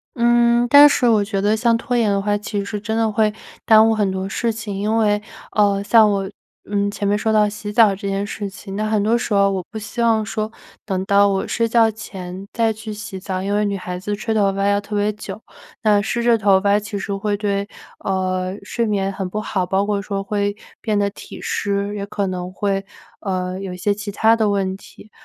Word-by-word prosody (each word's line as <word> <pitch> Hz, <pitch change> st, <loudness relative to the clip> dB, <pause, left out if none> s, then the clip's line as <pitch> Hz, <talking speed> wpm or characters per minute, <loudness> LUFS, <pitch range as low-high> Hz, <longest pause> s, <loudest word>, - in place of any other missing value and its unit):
嗯， 240 Hz, 0 st, +3 dB
但 285 Hz, +2 st, +9 dB
是 250 Hz, -3 st, +2 dB
我 220 Hz, -3 st, +4 dB
觉 200 Hz, -1 st, -2 dB
得 205 Hz, +2 st, +2 dB
像 230 Hz, +1 st, +2 dB
拖 245 Hz, +2 st, -3 dB
延 230 Hz, -3 st, +2 dB
的 200 Hz, 0 st, +1 dB
话 205 Hz, +1 st, 0 dB
其 205 Hz, -1 st, -3 dB
实 210 Hz, 0 st, -4 dB
真 220 Hz, +1 st, -2 dB
的 225 Hz, -1 st, +1 dB
会 215 Hz, 0 st, +2 dB, 0.3 s
耽 220 Hz, -1 st, +7 dB
误 -, -, +3 dB
很 205 Hz, -2 st, +1 dB
多 190 Hz, 0 st, -3 dB
事 230 Hz, +4 st, -1 dB
情。 220 Hz, -2 st, -6 dB
因 210 Hz, +3 st, 0 dB
为 210 Hz, -2 st, +2 dB, 0.3 s
呃， 200 Hz, -1 st, +2 dB
像 220 Hz, 0 st, +5 dB
我， 195 Hz, -1 st, -1 dB, 0.4 s
嗯， 205 Hz, 0 st, 0 dB
前 205 Hz, 0 st, -3 dB
面 205 Hz, +1 st, +2 dB
说 220 Hz, +1 st, 0 dB
到 210 Hz, -1 st, +4 dB
洗 210 Hz, 0 st, -6 dB
澡 210 Hz, -2 st, +5 dB
这 200 Hz, +1 st, -6 dB
件 195 Hz, +1 st, -1 dB
事 205 Hz, 0 st, -5 dB
情， 195 Hz, 0 st, -9 dB
那 215 Hz, +1 st, -1 dB
很 215 Hz, -1 st, +2 dB
多 220 Hz, +3 st, +2 dB
时 235 Hz, -2 st, -3 dB
候 200 Hz, 0 st, +4 dB
我 190 Hz, -2 st, -2 dB
不 225 Hz, -, -7 dB
希 215 Hz, +3 st, -5 dB
望 225 Hz, -2 st, +2 dB
说 215 Hz, +2 st, -3 dB, 0.3 s
等 190 Hz, -2 st, -2 dB
到 200 Hz, +1 st, +4 dB
我 195 Hz, -1 st, -1 dB
睡 230 Hz, -1 st, 0 dB
觉 230 Hz, 0 st, +4 dB
前 190 Hz, -3 st, -8 dB
再 225 Hz, -1 st, +1 dB
去 215 Hz, 0 st, -8 dB
洗 210 Hz, -2 st, -7 dB
澡， 185 Hz, 0 st, -4 dB
因 200 Hz, +2 st, -2 dB
为 210 Hz, -, +2 dB
女 200 Hz, -1 st, -1 dB
孩 180 Hz, -1 st, -5 dB
子 205 Hz, +3 st, -3 dB
吹 220 Hz, +2 st, -2 dB
头 205 Hz, -2 st, +2 dB
发 195 Hz, +1 st, 0 dB
要 200 Hz, 0 st, +2 dB
特 205 Hz, +1 st, -6 dB
别 205 Hz, +1 st, +1 dB
久， 210 Hz, -, -8 dB, 0.4 s
那 210 Hz, -2 st, +4 dB
湿 235 Hz, +3 st, -2 dB
着 235 Hz, -1 st, +4 dB
头 200 Hz, -3 st, +4 dB
发 200 Hz, +1 st, +3 dB
其 210 Hz, 0 st, -6 dB
实 200 Hz, +1 st, -4 dB
会 205 Hz, +1 st, -1 dB
对， 200 Hz, -1 st, -1 dB, 0.3 s
呃， 185 Hz, 0 st, -2 dB
睡 235 Hz, -, -2 dB
眠 195 Hz, -2 st, -1 dB
很 190 Hz, -1 st, -4 dB
不 215 Hz, -, -3 dB
好， 195 Hz, -3 st, -1 dB
包 190 Hz, +2 st, +1 dB
括 205 Hz, -1 st, -1 dB
说 200 Hz, -1 st, -3 dB
会 205 Hz, 0 st, -1 dB, 0.3 s
变 215 Hz, -2 st, 0 dB
得 200 Hz, 0 st, +1 dB
体 -, -, -11 dB
湿， 200 Hz, 0 st, -2 dB
也 200 Hz, -1 st, -4 dB
可 200 Hz, -1 st, -2 dB
能 180 Hz, -1 st, -4 dB
会， 195 Hz, +1 st, -1 dB, 0.4 s
呃， 185 Hz, -1 st, -3 dB
有 190 Hz, -2 st, -5 dB
一 -, -, -7 dB
些 205 Hz, +3 st, +1 dB
其 205 Hz, 0 st, -6 dB
它 220 Hz, +3 st, +4 dB
的 220 Hz, -2 st, +1 dB
问 195 Hz, -2 st, 0 dB
题。 210 Hz, +2 st, -15 dB
205 Hz, 250 characters per minute, -20 LUFS, 195-220 Hz, 0.4 s, 但